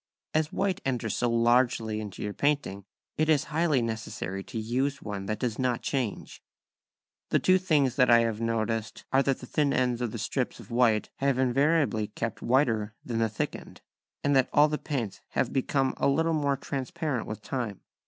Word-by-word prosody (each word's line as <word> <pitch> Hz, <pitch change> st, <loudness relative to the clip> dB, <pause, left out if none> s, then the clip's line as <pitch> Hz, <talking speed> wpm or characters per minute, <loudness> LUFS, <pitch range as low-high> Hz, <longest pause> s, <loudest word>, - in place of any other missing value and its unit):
As 155 Hz, 0 st, +1 dB
white 195 Hz, -2 st, -1 dB
enters 125 Hz, -4 st, -1 dB
so 120 Hz, -, +1 dB
largely 115 Hz, -2 st, +2 dB
into 105 Hz, -3 st, -7 dB
your 105 Hz, 0 st, -3 dB
painting 140 Hz, -10 st, -1 dB, 0.3 s
it 155 Hz, 0 st, +2 dB
is 150 Hz, -3 st, +4 dB
highly 155 Hz, -6 st, +2 dB
necessary 110 Hz, -4 st, -4 dB
to 125 Hz, -, -7 dB
use 130 Hz, +5 st, -1 dB
one 100 Hz, -2 st, -5 dB
that 110 Hz, 0 st, -1 dB
does 115 Hz, -1 st, -2 dB
not 125 Hz, -2 st, 0 dB
change. 125 Hz, -7 st, -3 dB, 0.9 s
The -, -, +3 dB
two 185 Hz, 0 st, +4 dB
things 145 Hz, -8 st, +2 dB
that 125 Hz, -2 st, +5 dB
I 120 Hz, 0 st, +7 dB
have 115 Hz, -1 st, -1 dB
noticed 115 Hz, -1 st, -2 dB
are 135 Hz, -, +5 dB
that 135 Hz, -1 st, 0 dB
the -, -, -7 dB
thin 145 Hz, +2 st, +1 dB
ends 125 Hz, -2 st, +1 dB
of 120 Hz, -, 0 dB
the -, -, -5 dB
strips -, -, -2 dB
of -, -, -12 dB
white 115 Hz, -3 st, +2 dB
have 140 Hz, -1 st, +1 dB
invariably 130 Hz, -3 st, +2 dB
kept 110 Hz, +1 st, -4 dB
whiter 115 Hz, -5 st, +1 dB
than 115 Hz, -2 st, -2 dB
the 115 Hz, -1 st, +2 dB
thick 110 Hz, -, -2 dB
end, -, -, -12 dB, 0.4 s
and 145 Hz, 0 st, +2 dB
that 130 Hz, -1 st, +3 dB
all 150 Hz, +1 st, +6 dB
the 150 Hz, -, -2 dB
paints 125 Hz, -10 st, -3 dB
have -, -, 0 dB
become 135 Hz, 0 st, +1 dB
a -, -, +2 dB
little 160 Hz, +4 st, +2 dB
more 140 Hz, -3 st, +1 dB
transparent 140 Hz, -1 st, -3 dB
with 110 Hz, -, -6 dB
time. 120 Hz, -7 st, -4 dB
125 Hz, 190 wpm, -28 LUFS, 110-140 Hz, 0.9 s, I